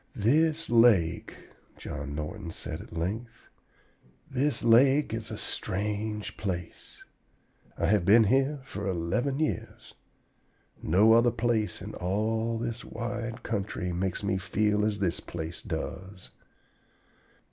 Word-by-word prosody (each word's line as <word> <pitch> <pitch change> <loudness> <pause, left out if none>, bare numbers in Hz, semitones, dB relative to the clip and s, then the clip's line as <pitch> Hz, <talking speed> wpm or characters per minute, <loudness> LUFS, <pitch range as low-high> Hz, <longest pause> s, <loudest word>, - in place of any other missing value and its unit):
"This 155 +9 +2
lake," 110 -8 +4 0.4
John 70 0 -6
Norton 85 +5 -5
said - - -5
at - - -13
length, 105 +8 -4 0.8
"this 135 0 0
lake 130 +3 +5
is 115 -1 -4
a - - -5
strange 105 +2 -3
place. 90 -4 -5 0.7
I - - 0
have 105 -3 +3
been 110 +5 +7
here 135 +6 +2
for 100 -6 -5
eleven 95 +10 -1
years. 155 - -3 0.9
No 105 +7 +5
other 115 +1 +5
place 110 -4 -1
in - - -7
all 110 +5 -1
this 115 +1 -4
wide 115 0 -5
country 100 -4 -3
makes 95 +3 -2
me 95 -1 0
feel 105 +2 +1
as 105 -1 0
this 95 -4 0
place 80 0 -6
does." 95 0 -6
105 Hz, 120 wpm, -28 LUFS, 95-120 Hz, 0.9 s, been